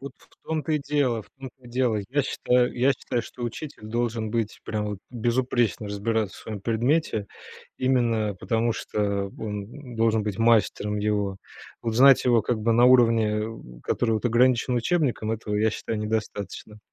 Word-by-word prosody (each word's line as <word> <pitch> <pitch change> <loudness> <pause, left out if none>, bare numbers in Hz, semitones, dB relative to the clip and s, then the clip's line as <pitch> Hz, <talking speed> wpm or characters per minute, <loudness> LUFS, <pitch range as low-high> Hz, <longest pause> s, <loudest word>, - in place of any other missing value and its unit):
Вот 140 +1 -8
в - - -23 0.2
том-то 160 0 -2
и 155 - +2
дело, 140 -6 0
в - - -24
том-то 130 -1 -12
и - - -11
дело. 120 -3 +1
Я 145 +2 +2
считаю, 125 -1 +1
я 130 +3 +4
считаю, 120 -2 -3
что 125 - -10
учитель 120 +1 -6
должен 115 -1 -2
быть 115 -2 -2
прямо 105 -1 -2
вот 100 - -5
безупречно 120 -4 0
разбираться 105 0 -1
в - - -12
своем 110 -2 -6
предмете. 115 +1 0 0.5
Именно 115 -5 +1
потому, 115 +3 0
что 100 -2 -2
он, 105 -2 -4
м, 125 +2 -11
должен 110 -1 +2
быть 105 -2 -3
мастером 110 -2 +2
его. 105 -2 -1 0.4
Вот 115 -1 -2
знать 135 +2 +7
его, 120 -2 +4
как 120 0 -1
бы, 115 +2 +1
на 120 +2 +5
уровне, 115 -4 +4
у - - -11
который 120 - 0
вот 110 +1 -1
ограничен 125 +1 +3
учебником, 120 -4 0
этого, 110 -2 -3
я 110 +2 +3
считаю, 110 - -4
недостаточно. 105 -1 -4
115 Hz, 175 wpm, -25 LUFS, 105-125 Hz, 0.5 s, знать